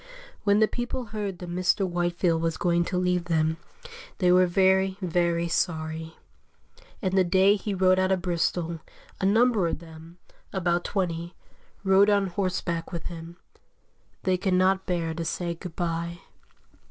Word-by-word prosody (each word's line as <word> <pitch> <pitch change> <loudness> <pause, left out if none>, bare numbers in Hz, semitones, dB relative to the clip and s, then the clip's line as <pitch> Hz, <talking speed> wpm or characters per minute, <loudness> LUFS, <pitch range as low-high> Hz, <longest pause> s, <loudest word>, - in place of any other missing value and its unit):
When 200 0 +4
the 220 0 +4
people 245 +2 -4
heard 205 -4 -3
that 175 0 -8
Mr. 185 +2 +1
Whitefield 175 -1 0
was 165 -1 -1
going 170 -1 +2
to 180 - -2
leave 180 -1 +1
them, 160 -1 +1 0.6
they 180 -2 +3
were 180 0 +5
very, 190 +1 +3
very 170 -2 0
sorry; 160 -1 -2 0.9
and 190 -1 0
the 190 - +5
day 190 +3 +4
he 205 -1 -3
rode 185 0 +4
out 185 0 +2
of 185 -2 0
Bristol, 170 -1 -1 0.4
a 190 - +1
number 220 -2 +3
of - - -2
them, 165 +1 -13 0.3
about 175 -2 0
twenty, 170 -3 -2 0.5
rode 195 +1 +5
on 200 -1 +3
horseback 185 -3 -2
with 170 - -5
him, 165 +1 -10 0.9
they 185 -1 +2
could 185 0 0
not 190 +1 +2
bear 170 -3 -1
to 165 +1 -4
say 170 +1 -2
"good 170 0 -9
bye." 170 0 -3
180 Hz, 155 wpm, -26 LUFS, 170-190 Hz, 0.9 s, were